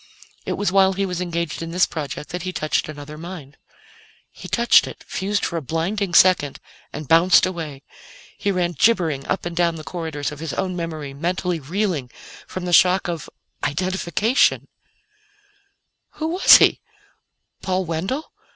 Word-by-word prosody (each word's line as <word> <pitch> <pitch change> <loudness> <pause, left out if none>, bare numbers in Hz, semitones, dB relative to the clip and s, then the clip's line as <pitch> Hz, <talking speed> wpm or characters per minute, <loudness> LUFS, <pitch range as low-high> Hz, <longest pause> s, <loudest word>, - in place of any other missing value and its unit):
It - - 0
was 200 -3 -1
while 190 0 +4
he 195 +1 -1
was 180 -1 -3
engaged 170 -3 -3
in 165 - -5
this 180 +2 +3
project 150 -1 -6
that 180 +1 -4
he 185 +1 -4
touched 155 -3 -1
another 150 0 -9
mind. 160 -5 -9 0.7
He - - -11
touched 235 -1 +4
it, - - -10
fused 200 +1 -1
for 170 - -3
a - - -2
blinding 175 +6 -2
second, 180 -7 +4 0.3
and 150 -1 -7
bounced 170 +5 +5
away. 160 -7 -6 0.5
He 200 - -2
ran 180 -3 0
gibbering 165 -6 +1
up 195 - -2
and 175 -1 -4
down 170 -1 +1
the 155 - -8
corridors 160 -4 -4
of 150 - -9
his 160 -1 -5
own 185 -1 -2
memory, 160 -5 -5
mentally 175 +3 -2
reeling 165 -3 -2 0.4
from 185 -1 -6
the 175 - -2
shock 185 +2 +5
of 170 -2 -5 0.3
identification! 185 - +1 1.5
Who 315 0 -3
was 360 +3 +8
he? - - +3 0.8
Paul 185 0 -1
Wendell? 185 - -3
175 Hz, 160 wpm, -22 LUFS, 155-185 Hz, 1.5 s, was